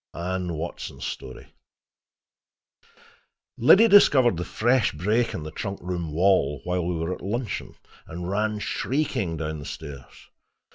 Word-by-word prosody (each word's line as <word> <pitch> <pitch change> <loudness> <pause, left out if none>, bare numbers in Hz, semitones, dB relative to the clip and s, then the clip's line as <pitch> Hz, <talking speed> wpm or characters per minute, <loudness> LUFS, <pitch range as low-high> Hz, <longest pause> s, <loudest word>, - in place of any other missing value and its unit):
ANNE 90 0 -3
WATSON'S 85 +2 -6
STORY 65 -1 -8 2.1
Liddy 195 - +7
discovered 135 - +6
the 85 - -2
fresh 120 +4 +1
break 105 +10 0
in 75 - -5
the 75 - -7
trunk 95 +4 -5
room 85 -3 -4
wall 80 -4 +2
while 90 0 -1
we 90 +1 -2
were 80 +2 -2
at - - -9
luncheon, 110 +3 -4 0.3
and 85 +2 -6
ran 105 +2 0
shrieking 105 - -2
down 80 -1 -4
the 70 - -9
stairs. 70 -5 -10
90 Hz, 135 wpm, -25 LUFS, 80-110 Hz, 2.1 s, Liddy